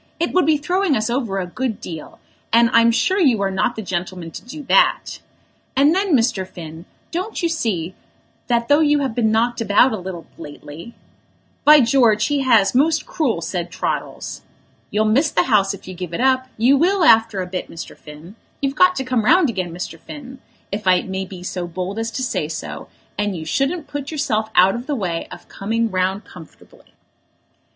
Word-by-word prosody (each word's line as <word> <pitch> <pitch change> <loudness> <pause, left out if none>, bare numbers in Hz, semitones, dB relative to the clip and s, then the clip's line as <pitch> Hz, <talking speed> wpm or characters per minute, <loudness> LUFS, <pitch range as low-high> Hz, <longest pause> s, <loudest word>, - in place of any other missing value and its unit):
"It 340 - -1
would 365 -5 +3
be 310 -1 +4
throwing 355 0 0
us 215 +2 -1
over 235 -6 -1
a 185 - -1
good 225 +4 -4
deal, 160 -3 -8 0.3
and 230 0 +4
I'm 230 0 +6
sure 240 - +1
you 260 - +3
are 195 - 0
not 190 +5 0
the 220 - -5
gentleman 180 -2 -4
to - - -9
do 295 +5 -9
that. - - +2 0.6
And 285 +4 +4
then, 380 -3 +2
Mr. 225 -6 +1
Finn, 165 -2 -10 0.3
don't 365 +4 -4
you - - +3
see 195 - -2 0.5
that 235 -1 +1
though 290 +1 +5
you 295 -2 +3
have 270 -5 -2
been 220 -2 +1
knocked 235 +2 +1
about 230 +4 +4
a 215 - -3
little 180 -2 -7
lately 150 +8 -10 0.3
" - - -40
"By 300 -1 +8
George, 230 -3 +3
he 290 -1 +1
has, 230 -7 +3
most 310 +5 +2
cruel," 245 - -1
said 175 +1 -3
Troddles. - - -4 0.5
"You'll 215 +1 +1
miss 265 +9 +3
the - - +2
House 205 -5 +2
if 195 - -16
you 185 - -6
give 175 -2 -6
it - - -4
up; 260 0 +2
you 250 +5 +4
will, 365 +5 +2
after 225 -8 +5
a 185 - -2
bit, 180 0 -5
Mr. 165 - -9
Finn. 155 +6 -13 0.2
You've 275 -1 -1
got 365 +4 +4
to 265 - -2
come 250 -3 0
round 310 - +4
again, 185 -5 -4
Mr. 175 +2 -7
Finn, 265 -3 -10 0.3
if 205 0 -4
I 185 -1 +4
may 190 0 -4
be 185 -1 -10
so 180 -1 -4
bold 185 +4 -4
as 225 0 -2
to 260 - -3
say 155 -11 -1
so, 155 0 -6 0.3
and 205 -3 -1
you 160 - -7
shouldn't 275 - -1
put 290 -1 -6
yourself 235 -9 -1
out 185 +2 +6
of 240 +2 -6
the 295 - -1
way 175 -8 -3
of - - -11
coming 225 +2 -2
round 190 +2 -1
comfortably." 160 -4 -16
225 Hz, 200 wpm, -20 LUFS, 185-275 Hz, 0.6 s, By